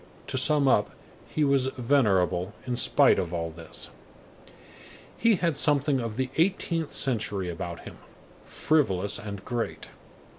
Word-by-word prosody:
To - - -5
sum 145 0 +4
up, 105 -5 +3 0.4
he 155 - 0
was 140 -2 +2
venerable 100 -8 +1
in 125 -1 -2
spite - - +4
of 85 - -3
all 85 -1 -3
this. 85 0 -9 1.2
He 230 -2 +3
had 170 -4 -1
something 145 -2 +2
of 115 -3 -4
the 130 +1 -2
eighteenth 165 -2 0
century 100 -8 -1
about 85 0 -6
him; - - -11 0.4
frivolous 100 - 0
and 100 -1 -8
great. 120 -2 -4
125 Hz, 135 wpm, -27 LUFS, 95-145 Hz, 1.2 s, sum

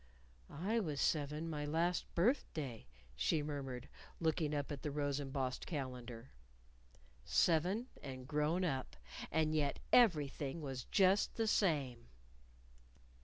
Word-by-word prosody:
"I 200 +9 0
was 155 -9 -2
seven 150 +2 0
my 150 -2 -3
last 165 +4 +1
birthday," 165 - 0 0.3
she 65 - +1
murmured, 135 -3 -4 0.3
looking 160 -2 +1
up 145 +1 -2
at 145 - -4
the 150 - -2
rose 145 -1 -1
embossed 135 -2 -3
calendar. 125 -5 -5 0.9
Seven, 180 - +2 0.2
and 130 -2 -7
grown 150 +5 +1
up 135 -6 -2 0.3
and 155 -1 +2
yet 145 -2 +1 0.2
everything 150 - +4
was 135 -5 -5
just 195 0 +3
the 225 - +1
same! 145 - +1
150 Hz, 120 wpm, -37 LUFS, 135-165 Hz, 0.9 s, everything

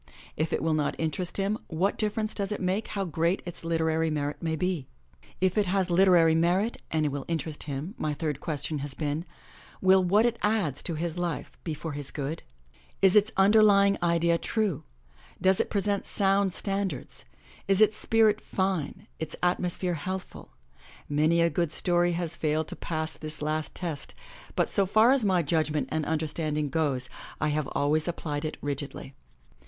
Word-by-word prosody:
If 155 +1 -1
it - - -1
will 160 -1 +2
not 150 -2 0
interest 165 +2 -2
him, 200 +2 0
what 180 +5 0
difference 215 0 0
does 200 -1 -3
it 210 - -2
make 190 +3 -1
how 200 -2 -2
great 170 +2 0
its 175 -1 -8
literary 160 -1 +1
merit 145 -1 -2
may 160 -2 -1
be? 170 -4 -2 0.5
If 185 +2 +2
it 205 - +1
has 185 -1 0
literary 175 -3 +5
merit 180 +7 +2
and 155 -1 +1
will 140 -1 -4
interest 160 -2 -3
him, 145 +8 -4
my 150 -1 -1
third 150 -2 -2
question 155 -1 -3
has 140 -1 -3
been, 150 +2 -2 0.5
"Will 190 0 +5
what 205 +5 +4
it 235 -1 0
adds 210 - 0
to 170 - -3
his 170 +2 -3
life 175 -3 -3
be 160 -3 -3
for 160 +2 -5
his 145 -1 -3
good? 150 +3 -4 0.6
Is 190 0 +6
its 210 +1 +5
underlying 200 0 +6
idea 170 0 +2
true, 215 -9 -1 0.5
does 190 0 +3
it - - +1
present 200 -1 0
sound 195 0 +2
stan 200 0 -1
dards, - - -7 0.4
is 195 0 +3
its 215 0 +5
spirit 215 -1 +3
fine, 190 -6 -2
its 160 - -4
atmosphere 180 0 0
healthful?" 185 +4 -6 0.6
Many 155 +3 +3
a 170 - +4
good 170 -4 0
story 175 0 +2
has 170 -1 -2
failed 155 0 0
to - - -6
pass 160 -1 -3
this 155 -1 -7
last 155 +1 -2
test, 165 -6 -5 0.4
but - - +2
so 195 -1 +2
far 220 +5 +5
as 270 -3 +3
my 185 -4 +3
judgment 155 0 0
and 155 -1 -1
understanding 155 -1 -1
goes, 135 -4 0 0.3
I 155 - +1
have 150 -1 -1
always 150 +3 +1
applied 155 -3 -3
it 155 - -4
rigidly. 140 -1 -4
170 Hz, 175 wpm, -28 LUFS, 155-195 Hz, 0.6 s, Is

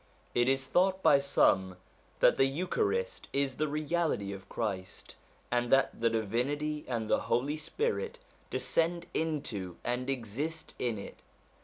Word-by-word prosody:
It 120 +1 +3
is 135 0 +1
thought 190 +1 +2
by 140 - +7
some 95 -9 +3 0.4
that - - +6
the 135 - +5
Eucharist 415 - -1
is 140 -2 +1
the 155 - +1
reality 150 - 0
of 100 0 -10
Christ, 95 -5 -4 0.4
and 120 0 +1
that 135 -3 +3
the 115 - +4
Divinity 130 +8 -1
and 115 -3 -2
the - - +3
Holy 130 +6 +1
Spirit 455 - -2 0.3
descend 170 +1 +1
into 115 - -2
and 125 +2 -1
exist 135 +6 -3
in 120 -3 0
it. 100 - -8
135 Hz, 140 wpm, -31 LUFS, 115-160 Hz, 0.4 s, by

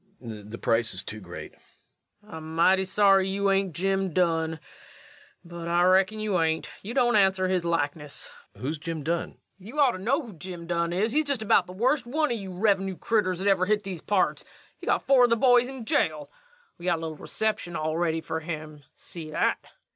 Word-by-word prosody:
_] 105 -3 -8
The 115 - -7
price 115 0 +1
is - - -3
too 110 - -7
great. 90 -3 -9 0.7
LUKE. 210 - -15
I'm 160 0 -7
mighty 190 +3 +4
sorry 195 0 +4
you 200 0 +1
ain't 195 -4 +1
Jim 195 +1 0
Dunn. 165 -3 +1 0.9
But 170 -1 -7
I 175 +1 +3
reckon 190 +4 +3
you 210 -4 0
ain't. 160 0 0
You 225 +5 -6
don't 240 -3 +3
answer 190 -2 +3
his 185 -2 0
likeness. 150 -3 -2 0.2
REVENUE. - - -8
Who's 155 +2 -2
Jim 165 -2 -5
Dunn? 170 +3 -1
LUKE. - - -22 0.2
You 225 +11 -8
ought 275 -4 +5
to 185 - -7
know 270 - 0
who 230 -5 -10
Jim 175 +1 -8
Dunn 170 0 -1
is. 205 +6 0
He's 310 +4 +2
just 280 -6 -1
about 195 -4 +3
the 180 - -9
worst 245 +5 +1
one 300 +3 0
of 235 - -1
your 190 -2 -7
revenue 195 -3 +1
critters 200 -5 0
that 190 +3 -2
ever 190 -2 +3
hit 210 0 +1
these 190 -4 -6
parts. 200 -3 +1 0.4
He's - - -10
got - - +1
four 265 -2 +6
of - - 0
the 230 - +3
boys 245 0 +5
in 260 -3 -7
jail. 155 -8 0 0.5
We 170 - -9
got 175 -2 +2
a - - -8
little 160 -1 -5
reception 215 -4 -2
all 155 0 -1
ready 165 -1 0
for 160 - -3
him. 155 -2 -7
See 160 -3 -9
that? 155 - +1
185 Hz, 215 wpm, -26 LUFS, 165-210 Hz, 0.9 s, four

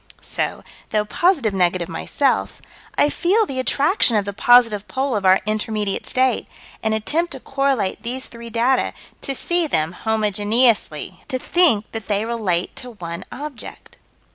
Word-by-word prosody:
So, - - -3 0.3
though 210 -1 0
positive 285 - +1
negative, 180 -2 +1
myself, 265 - -1 0.4
I - - +5
feel 400 +9 +2
the 265 -8 -5
attraction 275 - +3
of 205 - 0
the 200 - -4
positive 225 -2 +4
pole 265 -1 -1
of 200 -2 +1
our 185 +1 +5
intermediate 215 -1 -2
state, 255 -2 +1 0.3
and 220 0 0
attempt 320 +11 0
to - - -7
correlate 270 -8 -1
these 250 +3 -3
three 235 0 -9
data: 240 +3 +1 0.3
to 275 - -3
see 345 +4 0
them 160 - 0
homogeneously; 215 - +1
to 260 - -2
think 255 - +2
that 225 -3 -6
they 205 +1 0
relate 210 -7 -1
to 250 - -7
one 170 -4 -6
object. 290 -2 -8
230 Hz, 150 wpm, -21 LUFS, 205-265 Hz, 0.4 s, I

